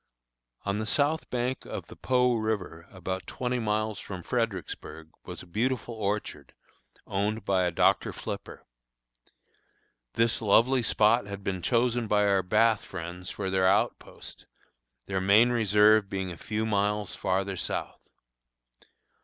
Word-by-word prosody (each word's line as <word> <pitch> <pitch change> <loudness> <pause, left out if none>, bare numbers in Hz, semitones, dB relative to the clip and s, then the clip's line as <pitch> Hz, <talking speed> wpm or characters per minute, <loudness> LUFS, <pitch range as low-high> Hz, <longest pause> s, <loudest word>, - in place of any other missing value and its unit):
On 100 +1 -1
the 110 - -3
south 145 +7 +1
bank 125 +1 -2
of - - -6
the - - -13
Po 125 -1 +2
river, 105 -7 -3
about 95 0 -5
twenty 125 0 -2
miles 110 -2 -1
from 90 -3 -7
Fredericksburg, 95 -9 -4
was - - -7
a - - -13
beautiful 120 +6 -1
orchard, 100 - -3 0.5
owned 105 +3 -2
by 95 -2 +2
a 90 - 0
Dr. - - +2
Flipper. - - -7 1.5
This 115 0 +2
lovely 120 +5 +4
spot 110 0 +3
had 100 0 -7
been 95 -2 -2
chosen 120 +3 +1
by 105 0 +3
our 100 -1 +3
Bath 110 +4 +3
friends 90 0 -7
for 95 -2 -4
their 95 -1 +3
outpost, 95 +2 -1 0.6
their 95 -1 -2
main 105 +6 +5
reserve 105 -2 +4
being 95 -1 -3
a - - -6
few 110 +6 -3
miles 105 -2 0
farther 95 +1 -1
south. - - -4
105 Hz, 135 wpm, -28 LUFS, 95-115 Hz, 1.5 s, main